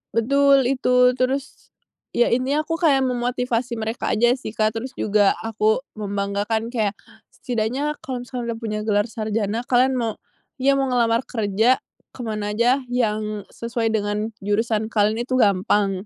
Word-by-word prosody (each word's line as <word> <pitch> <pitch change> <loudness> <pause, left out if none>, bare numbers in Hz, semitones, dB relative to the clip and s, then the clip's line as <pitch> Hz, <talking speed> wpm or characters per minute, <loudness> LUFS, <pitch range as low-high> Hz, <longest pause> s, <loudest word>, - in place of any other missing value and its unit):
Betul, 275 +4 +4
itu, 250 -1 +3
terus 260 +2 -2 0.4
ya, 240 - +3
intinya 260 +5 +1
aku 330 0 -2
kayak 285 -6 +4
memotivasi 245 -1 -1
mereka 225 +1 -2
aja 240 +2 +4
sih, 220 -4 -7
Kak, 215 0 +1
terus 250 +3 -5
juga 205 -1 +3
aku 220 +2 +1 0.2
membanggakan 205 +2 -2
kayak, 215 -4 0 0.4
"Setidaknya 250 +5 -2
kalau 250 -2 -4
misal 250 0 -5
udah 230 -1 -3
punya 215 -2 -3
gelar 205 -1 +2
sarjana, 215 0 -2
kalian 255 +1 +3
mau 230 -3 -2 0.4
iya, 275 +1 +3
mau 270 -1 0
ngelamar 235 -1 +2
kerja 220 +2 +2 0.4
ke 255 - -9
mana 215 -2 -3
aja 245 +5 +2
yang 215 -4 -1
sesuai 230 -1 -2
dengan 210 +1 -1
jurusan 220 +2 0
kalian 215 +2 +2
itu 255 0 -1
gampang." 195 -1 +2
230 Hz, 150 wpm, -22 LUFS, 215-250 Hz, 0.4 s, Betul